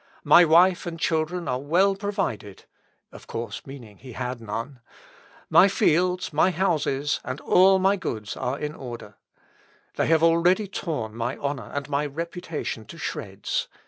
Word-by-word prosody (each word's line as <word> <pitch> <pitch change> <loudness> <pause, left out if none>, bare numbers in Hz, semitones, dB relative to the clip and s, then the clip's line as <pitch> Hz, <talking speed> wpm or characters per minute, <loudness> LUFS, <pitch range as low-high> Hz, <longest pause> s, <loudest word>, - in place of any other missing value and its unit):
My 175 - +7
wife 175 +3 +4
and 165 -1 -6
children 165 +2 -1
are 125 0 -1
well 185 +7 +2
provided, 195 - -4 0.5
(of - - -14
course, 115 +1 -6
meaning 120 -7 -11
he 130 -2 -11
had 125 -1 -4
none;) 115 +5 -5 0.7
my 190 - +6
fields, 180 -2 +1
my 160 +5 +4
houses, 155 -6 0
and 130 +3 -5
all 190 +1 +5
my 195 +2 +2
goods, 110 - -5
are 130 +3 -3
in 150 0 -4
order. 120 -5 -9 0.8
They - - +1
have 160 0 +3
already 170 +5 +4
torn 150 - -4
my 120 +3 -3
honour 140 -6 -4
and 140 -1 -4
my 145 0 -1
reputation 165 -5 -5
to - - -12
shreds. - - -4
155 Hz, 150 wpm, -25 LUFS, 125-180 Hz, 0.8 s, My